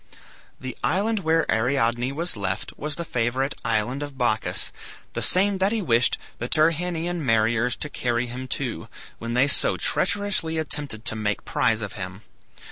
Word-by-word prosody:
The 130 -2 -6
island 205 +6 +1
where 165 -2 +2
Ariadne 120 +1 +1
was 170 +1 -2
left 95 -3 -2
was 150 0 -4
the 170 - -4
favorite 130 +2 0
island 115 +4 0
of 145 -2 -6
Bacchus, 120 -4 0 0.4
the - - -3
same 195 +1 +4
that 190 +2 +3
he 225 - 0
wished 120 -5 +3 0.2
the 120 - -2
Tyrrhenian 165 +1 +1
mariners 115 0 +2
to - - -3
carry 120 -4 -1
him 125 +2 -6
to, 130 -1 -3 0.3
when 115 +1 -3
they 130 +3 +4
so - - +3
treacherously 195 -5 +1
attempted 145 -7 -1
to - - +3
make 105 -2 -2
prize 115 -2 +1
of 100 - -5
him. 95 0 -6
130 Hz, 160 wpm, -24 LUFS, 115-160 Hz, 0.4 s, same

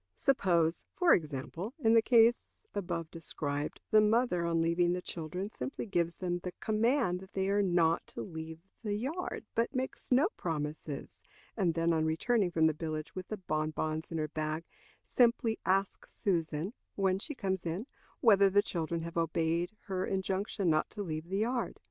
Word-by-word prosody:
Suppose, 175 - +2
for 360 -2 +5
example, 165 - -2
in 225 -7 +3
the 230 - +7
case 235 +1 +5 0.3
above 170 -5 -3
described, 145 -3 -3
the 215 - +7
mother, 215 -4 +2
on 165 0 +1
leaving 170 +1 +2
the 180 - -1
children, 180 +5 -4
simply 270 - -5
gives 170 -5 0
them 175 -1 -2
the 180 0 -6
command 220 -2 +1
that 190 +1 -13
they 190 0 0
are 205 +1 +3
not 175 -4 +2
to - - -6
leave 160 -2 -7 0.2
the 205 -2 -1
yard, 270 - -3
but 230 +4 0
makes 260 0 -4
no 265 +7 +5
promises, 150 -3 -4 0.3
and 180 -7 +1
then, 165 0 +2
on 160 -1 +2
returning 185 +6 +2
from 160 -2 +2
the 160 - +4
village 155 0 -4
with 185 -1 -6
the 215 - -4
bonbons 155 -2 -2
in 165 - -2
her 155 -1 0
bag, 155 +1 -3 0.4
simply 235 -2 +2
asks 195 +1 0
Susan, 170 0 -1 0.2
when 190 -1 +2
she 295 +7 -5
comes 190 -6 -2
in, 175 +7 -3 0.4
whether 200 -5 +6
the 205 +1 +4
children 165 -1 -2
have 170 0 -6
obeyed 165 +2 +1
her 185 -2 -2
injunction 190 +1 -1
not 155 -2 +2
to 205 - -5
leave 160 -1 -5
the 195 - -1
yard. 235 +3 -1
180 Hz, 175 wpm, -32 LUFS, 165-210 Hz, 0.4 s, the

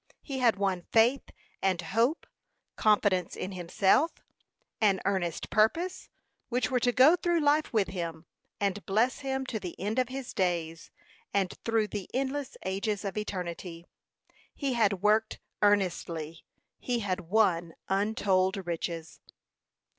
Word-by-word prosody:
He 270 -3 -4
had 240 -3 +4
won 195 -2 0
faith 235 +4 +4 0.4
and 190 -3 +1
hope, 230 - 0 0.5
confidence 205 -4 +2
in 185 - -4
himself, 190 - +2 0.7
an 200 -3 +4
earnest 185 -4 -1
purpose, 335 +13 +1 0.4
which 250 +1 0
were 250 - +2
to 245 +1 +2
go 265 +7 +6
through 345 -1 +1
life 300 0 +2
with 215 -4 +1
him, 165 -3 -5 0.3
and 200 0 -1
bless 225 +7 +2
him 265 -1 -2
to 230 -4 -3
the 180 -4 -7
end 210 +6 -1
of 255 -1 +1
his 265 -1 -6
days, 170 -3 -1 0.5
and 195 -3 +1
through 225 -2 +1
the 205 -3 -5
endless 270 +1 -2
ages 200 +2 -2
of 195 - -3
eternity. 180 -4 -5 0.7
He 275 -3 -1
had 205 -5 +1
worked 215 +1 +3 0.2
earnestly; 170 -5 0 0.3
he 245 -2 -1
had 190 -3 -1
won 175 -6 +2
untold 195 -1 +1
riches. 165 -2 -4
205 Hz, 135 wpm, -29 LUFS, 185-245 Hz, 0.7 s, go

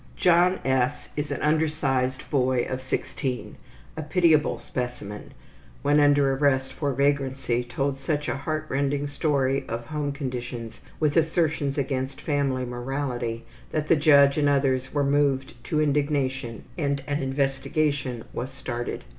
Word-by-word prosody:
John 180 +1 +4
S., 130 +1 +1 0.2
an 140 - -3
undersized 145 -4 +1
boy 130 -3 +2
of 130 0 -3
16, 130 0 -3 0.4
a 160 - -4
pitiable 155 -1 +3
specimen, 120 -5 -5 0.5
when 145 +1 +4
under 145 -2 +4
arrest 135 -1 +1
for 145 +1 -1
vagrancy 135 -3 0
told 135 +3 -2
such 145 +1 -1
a - - 0
heartrending 145 -1 -1
story 140 -2 0
of 115 +1 -4
home 145 +2 -2
conditions, 125 -4 -5 0.2
with 150 -2 +1
assertions 155 -3 +1
against 135 0 -2
family 140 -4 0
morality, 120 -2 -3 0.3
that 155 -1 -2
the - - +7
judge 140 -1 +5
and 145 -1 +3
others 135 -2 +1
were 145 -1 +1
moved 140 -1 +1
to 155 - 0
indignation 140 -5 0 0.2
and 140 -2 0
an 145 0 -1
investigation 135 -1 -1
was 125 - -3
started. 120 -3 -5
140 Hz, 130 wpm, -26 LUFS, 130-145 Hz, 0.5 s, the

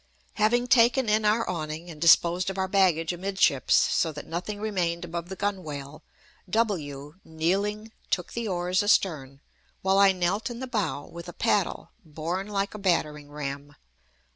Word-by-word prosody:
Having 240 +3 +2
taken 245 +1 +4
in 215 0 +2
our 220 +2 +2
awning 160 -1 -4
and 150 -2 -12
disposed 170 +2 +5
of 195 - -5
our 190 0 0
baggage 180 -4 +2
amidships, 185 -7 +2
so 165 - +2
that 150 -1 -8
nothing 180 +5 -5
remained 180 -5 -1
above 170 0 -5
the 190 - -5
gunwale, 155 -8 -4 0.5
W, 160 -8 -2
kneeling, 200 +7 -1 0.2
took 180 -2 -2
the 235 -1 -3
oars 180 -1 0
astern, 150 -10 +1 0.4
while 190 +1 +3
I 200 -1 +7
knelt 190 +6 -1
in 240 -1 -7
the 260 - -4
bow 210 - -2
with 170 +1 -10
the 175 - -8
paddle 205 -5 0
borne 165 +5 -4
like 200 -1 -2
a 215 - -7
battering 150 -6 0
ram. 145 0 -6
180 Hz, 160 wpm, -26 LUFS, 160-205 Hz, 0.5 s, I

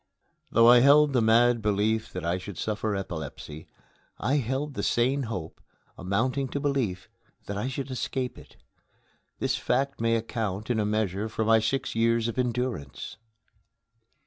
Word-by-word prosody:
Though 115 +1 +5
I 120 0 +8
held 145 +2 +6
the 125 - +3
mad 115 +1 +4
belief 105 +1 0
that 90 -2 -5
I 85 +2 0
should 95 -1 -8
suffer 110 -1 -2
epilepsy, 80 -4 -6 0.5
I 140 +4 +1
held 135 +3 -2
the - - -3
sane 130 +3 +1
hope, 90 -8 -6 0.3
amounting 120 +9 -1
to 140 - -3
belief, 130 -10 -1 0.4
that 100 - -5
I 105 +5 -2
should 135 +1 -4
escape 130 0 -3
it. - - -17 0.8
This - - 0
fact 135 0 -1
may 115 0 +2
account, 110 -2 -3
in 115 - +1
a 105 - +1
measure, 105 0 -1
for 110 0 -2
my 110 0 +5
six 115 +5 -1
years 115 0 +2
of 115 +2 -3
endurance. 120 - -3
115 Hz, 155 wpm, -27 LUFS, 100-130 Hz, 0.8 s, I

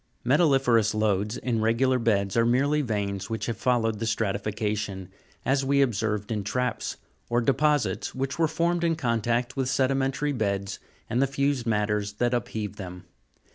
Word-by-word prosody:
23. 125 - +1 0.2
Metalli'ferous 120 -6 +3
lodes 105 +1 0
in 115 -3 -1
regular 125 +4 +2
beds, 100 -4 +1
are 115 - +4
merely 140 +6 +2
veins 100 -5 -2
which 110 0 -3
have 115 - -2
followed 115 -2 +1
the 115 - -2
stratification, 105 -2 -2 0.4
as 135 +1 +2
we 140 +1 +3
observed 110 -3 -1
in 105 -2 -1
traps 125 +5 -2
(fig. - - -20 0.3
283), 120 - +1
or - - +4
deposits 145 +3 +1
which 135 +4 -3
were 165 - +4
formed 170 +2 0
in 165 -1 +2
contact 120 -2 0
with 135 -2 -1
sedimentary 135 +2 +1
beas 100 -5 -2 0.3
and 120 - 0
the 135 - +3
fused 135 -2 0
matters 105 -1 0
that 120 +3 0
upheaved 105 -3 -3
them. 90 -2 -7
115 Hz, 170 wpm, -26 LUFS, 105-135 Hz, 0.4 s, are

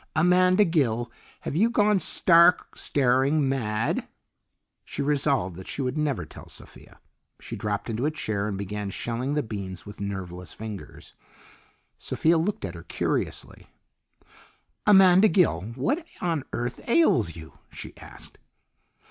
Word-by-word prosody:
"Amanda 180 +4 +4
Gill, 120 - 0 0.3
have - - -5
you 215 +8 +3
gone 210 -3 +3
stark 170 0 +4
staring 135 +2 +2
mad?" 115 -4 -1 0.8
She - - -4
resolved 140 - 0
that 95 - -10
she 140 - -4
would 125 +1 -2
never 150 -3 -1
tell - - -13
Sophia. - - -13 0.4
She - - -7
dropped 105 -1 -3
into 115 +4 -1
a - - +2
chair 110 -9 -3
and 100 -2 -3
begun 100 +1 -4
shelling 120 +7 -3
the 150 - 0
beans 95 -5 -6
with 100 0 -10
nerveless 90 -3 -6
fingers. 110 -3 -9 0.9
Sophia 165 +1 +1
looked 185 - -2
at 90 - -6
her 85 - -9
curiously. 85 - -3 1.2
"Amanda 190 0 +7
Gill, 175 - +2
what 270 - -1 0.2
on 165 -6 -1
earth 120 0 -3
ails 130 - +3
you?" 80 -1 -12
she - - -9
asked. - - -12
130 Hz, 135 wpm, -26 LUFS, 105-170 Hz, 1.2 s, Amanda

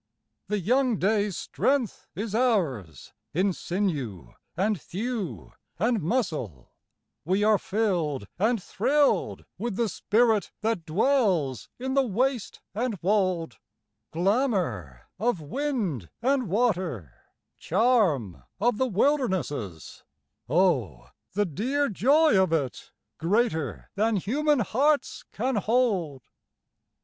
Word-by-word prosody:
The 210 +2 0
young 245 +4 +2
day's 205 -1 +1
strength 265 -5 -1
is 210 +1 -4
ours 160 - 0 0.2
in 190 +2 +2
sinew 155 - -3 0.2
and 200 -2 0
thew 215 -1 -4 0.2
and 225 +5 +1
muscle, 155 - -2 0.5
We 190 +6 +1
are 215 -1 +4
filled 175 - -1
and 225 +3 +2
thrilled 285 +7 +1
with 235 -4 -2
the 235 +2 +1
spirit 220 +2 +1
that 215 -6 -1
dwells 180 - +1
in 260 +2 -3
the 275 - +4
waste 250 0 -1
and 225 0 -2
wold, 185 - 0 0.5
Glamor 175 - 0 0.2
of 225 -3 +1
wind 185 - -2
and 260 0 +1
water, 180 - 0 0.5
charm 175 - +2 0.2
of 225 +2 +1
the 260 - +2
wilderness 225 - +1
es 95 - -7 0.2
— - - -46
Oh, 130 - +1 0.2
the 205 +2 +1
dear 255 - -1
joy 280 - +4
of 185 -3 +1
it, 145 -6 -2 0.3
greater 165 - 0
than 220 +2 +1
human 280 - +1
hearts 280 +8 +1
can 250 +2 -1
hold! 200 - 0
205 Hz, 110 wpm, -26 LUFS, 160-245 Hz, 0.5 s, are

